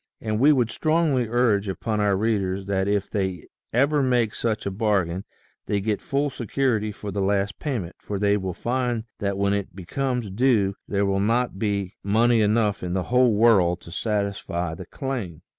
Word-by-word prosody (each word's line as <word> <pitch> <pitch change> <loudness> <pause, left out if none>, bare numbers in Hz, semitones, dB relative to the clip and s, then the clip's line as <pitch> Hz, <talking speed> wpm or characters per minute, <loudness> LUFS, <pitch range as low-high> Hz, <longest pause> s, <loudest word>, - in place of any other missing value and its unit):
And 110 -1 -2
we 145 +5 +6
would 125 -6 +2
strongly 155 -6 +1
urge 115 -4 +2
upon 105 +3 -2
our 100 -2 +2
readers 100 -3 0
that 95 -1 0
if 100 -1 0
they 95 -5 -2 0.3
ever 140 +5 +3
make 120 -4 +2
such 110 -2 -2
a 100 - -1
bargain, 95 -3 0 0.4
they 100 - +1
get 105 +1 -1
full 140 +1 -1
security 120 -3 -1
for 105 0 -7
the 100 +1 -2
last 100 +1 0
payment 115 - -3
for 100 - -4
they 100 +1 +2
will 95 -3 -3
find 120 -2 -1 0.2
that 100 -1 -1
when 100 0 +1
it 100 -2 -3
becomes 120 +3 -2
due 105 -3 +2
there 100 0 +1
will 100 0 +1
not 115 0 0
be 100 0 -2
money 115 +3 +3
enough 105 -1 +2
in 90 -1 -3
the 95 -1 0
whole 125 -3 +5
world 100 -6 +4
to 85 - -12
satisfy 100 -4 -2
the 90 +1 -9
claim. 120 - -5
105 Hz, 180 wpm, -24 LUFS, 100-120 Hz, 0.4 s, we